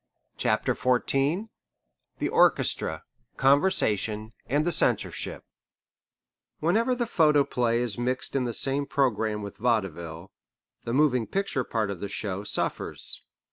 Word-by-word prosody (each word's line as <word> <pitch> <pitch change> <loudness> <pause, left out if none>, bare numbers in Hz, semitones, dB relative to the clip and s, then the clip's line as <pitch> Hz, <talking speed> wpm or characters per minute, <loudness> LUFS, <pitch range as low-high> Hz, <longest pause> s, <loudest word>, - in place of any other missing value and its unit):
CHAPTER - - +1
XIV 135 - +1 0.7
THE - - -1
ORCHESTRA, - - +2 0.3
CONVERSATION, 115 - +2
AND 145 +4 +1
THE 175 - +1
CENSORSHIP - - 0 1.2
Whenever 225 +10 +2
the 240 -1 -1
photoplay 140 - +2
is 120 -3 -1
mixed 125 +2 -1
in 130 -2 +1
the 120 - -1
same 140 +1 -1
programme 110 -7 0
with 100 - -8
vaudeville, 95 -7 -2 0.5
the 115 - -2
moving 130 -5 +2
picture 195 -9 -1
part 110 -4 -1
of 95 - -6
the 100 - -5
show 100 -1 -4
suffers. - - -1
125 Hz, 120 wpm, -27 LUFS, 105-145 Hz, 1.2 s, ORCHESTRA